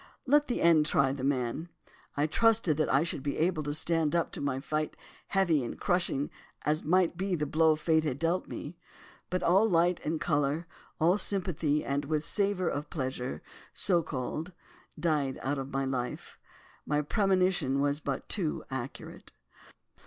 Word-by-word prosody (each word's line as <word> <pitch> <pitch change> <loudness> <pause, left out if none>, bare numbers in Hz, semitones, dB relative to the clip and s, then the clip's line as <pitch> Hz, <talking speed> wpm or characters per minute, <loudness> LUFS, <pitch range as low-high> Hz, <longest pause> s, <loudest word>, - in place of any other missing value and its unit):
Let 290 +2 +4
the 245 - -1
end 160 -3 +5
try 135 -3 +3
the 135 -2 -6
man. 135 +4 -1 0.5
I 145 - +3
trusted 215 0 +3
that 155 - +1
I 135 +3 +4
should 165 -4 -2
be 140 +1 -3
able 165 -1 +1
to 145 -1 -3
stand 160 +1 +1
up 170 - +1
to - - -6
my 140 -2 -1
fight, 155 +2 -3 0.3
heavy 175 -8 +2
and 120 - -6
crushing 175 -6 0 0.3
as 155 +1 +1
might 175 +1 +2
be 190 0 0
the 150 -2 -1
blow 160 +1 +3
Fate 160 +1 +2
had 145 -5 -2
dealt 165 +4 0
me. 150 +5 -7 0.5
But 185 +1 -1
all 195 +6 +4
light 175 0 +3
and 155 +1 -1
colour, 150 0 0 0.3
all 175 +5 +4
sympathy 170 -7 +1
with - - -4 0.2
and 155 -1 0
savour 200 -2 0
of 145 -1 -3
pleasure, 130 -3 -4 0.3
so 175 -3 +3
called, 155 +5 -4 0.5
died 150 -5 0
out 140 +1 -1
of 135 0 -5
my 135 0 -1
life. 125 -2 -4 0.4
My 150 0 0
premonition 185 - +1
was 145 +1 +1
but 140 -3 -4
too 175 -8 -2
accurate. 130 0 -7
155 Hz, 165 wpm, -30 LUFS, 140-175 Hz, 0.5 s, end